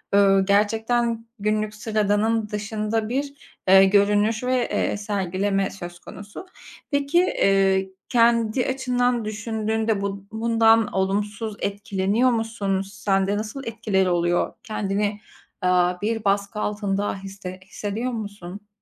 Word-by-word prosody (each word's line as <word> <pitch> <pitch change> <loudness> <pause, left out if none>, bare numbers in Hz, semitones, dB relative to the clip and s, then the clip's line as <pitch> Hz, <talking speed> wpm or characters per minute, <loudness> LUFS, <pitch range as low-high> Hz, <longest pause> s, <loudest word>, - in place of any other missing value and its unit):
ııı, 195 -1 +5
gerçekten 225 +3 +1
günlük 215 +1 -1
sıradanın 215 0 0
dışında 215 +1 -2
bir, 280 +2 -2 0.4
ııı, 190 0 +8
görünüş 205 +3 +3
ve, 255 -1 0
ııı, - - -2
sergileme 195 -1 -1
söz 175 -2 -9
konusu. 205 - -10 0.5
Peki, 285 +6 +2
ııı, 195 -1 +3 0.2
kendi 235 0 +3
açından 250 -3 0
düşündüğünde 220 0 -1
bu 200 0 -4
bundan 225 0 +3
olumsuz 205 +3 -1
etkileniyor 200 +4 0
musun? 225 -4 -1
Sen 195 -1 -1
de 205 +1 0
nasıl 220 +6 -5
etkileri 210 -5 0
oluyor? 175 0 +1
Kendini, 205 -1 -2 0.5
ııı, 180 0 +3
bir 225 +1 -1
baskı 200 +2 0
altında 205 -1 -1
hisse 195 -1 -8
hissediyor 215 +5 -4
musun? 205 -2 -7
210 Hz, 115 wpm, -23 LUFS, 195-225 Hz, 0.5 s, ııı